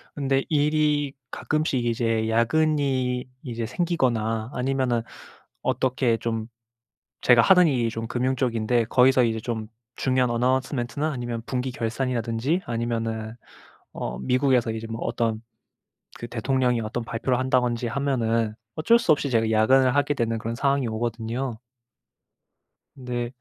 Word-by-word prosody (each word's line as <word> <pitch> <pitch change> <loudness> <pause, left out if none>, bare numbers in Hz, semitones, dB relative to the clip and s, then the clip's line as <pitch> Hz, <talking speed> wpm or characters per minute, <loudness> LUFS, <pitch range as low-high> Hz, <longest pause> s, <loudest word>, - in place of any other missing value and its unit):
근데 135 -1 +1
일이 150 -1 +2 0.2
가끔씩 155 -6 -1
이제 115 -1 0
야근이 130 +1 +1 0.2
이제 115 -2 -4
생기거나 120 -7 0
아니면은 125 -2 0 0.6
어떻게 125 -3 +1
좀 115 -1 -3 0.7
제가 120 -2 +6
하는 180 +6 +6
일이 120 -5 +1
좀 115 0 -5
금융 130 +3 0
쪽인데 115 -2 +1
거기서 130 +2 +4
이제 115 -1 0
좀 110 -1 -4 0.3
중요한 130 -1 +1
announcement나 130 +4 0
아니면 120 -4 -4
분기 130 0 -2
결산이라든지 120 - -1
아니면은 115 -1 -3 0.6
어 - - -4
미국에서 130 -2 +2
이제 110 0 -5
뭐 115 0 -5
어떤 110 -2 -1 0.8
그 120 - -7
대통령이 125 +1 0
어떤 115 +2 -4
발표를 120 +2 -1
한다든지 125 -2 +1
하면은 115 -4 0 0.2
어쩔 230 +10 +4
수 235 - +3
없이 145 -2 0
제가 115 -2 +2
야근을 130 +4 +4
하게 145 0 +2
되는 115 -3 -1
그런 115 +1 -4
상황이 140 +1 +1
오거든요. 115 +2 -3 1.4
네. 125 -2 -4
120 Hz, 325 characters per minute, -25 LUFS, 115-135 Hz, 1.4 s, 제가